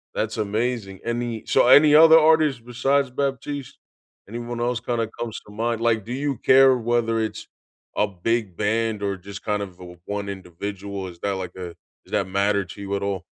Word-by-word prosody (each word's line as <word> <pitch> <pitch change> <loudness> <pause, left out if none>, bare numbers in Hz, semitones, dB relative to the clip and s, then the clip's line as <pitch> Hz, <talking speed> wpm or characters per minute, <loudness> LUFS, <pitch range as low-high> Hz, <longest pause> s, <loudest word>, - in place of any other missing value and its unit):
that's - - -2
amazing. 105 -2 -2
Any 120 -1 -3
So - - +3
any 145 +3 +7
other 160 +1 +9
artists 155 -5 +3
besides 135 +3 0
Batiste? 140 +1 -3 0.5
Anyone 120 +1 -5
else 120 0 0
kinda 115 -1 -2
comes 115 -1 -4
to - - -13
mind? 115 +1 -2
Like, 115 -2 +1
do 120 - -5
you 140 -1 -2
care 130 +1 +5
whether 115 -1 0
it's 110 -2 -4 0.5
a 105 - +2
big 100 0 -2
band 110 0 0
or 100 -1 -1
just 100 +2 -10
kind 105 -1 -1
of 95 -3 -10
the 90 -2 -12
one 100 0 -4
individual? 100 +1 -6
Is 85 -2 -11
that 100 +2 -1
like 90 -1 -6
a 90 -2 -7 0.3
Does - - -20
that 95 - 0
matter 100 +1 +1
to 100 +3 -11
you 100 0 -3
at 100 - -3
all? 100 -2 -2
110 Hz, 190 wpm, -23 LUFS, 100-120 Hz, 0.5 s, other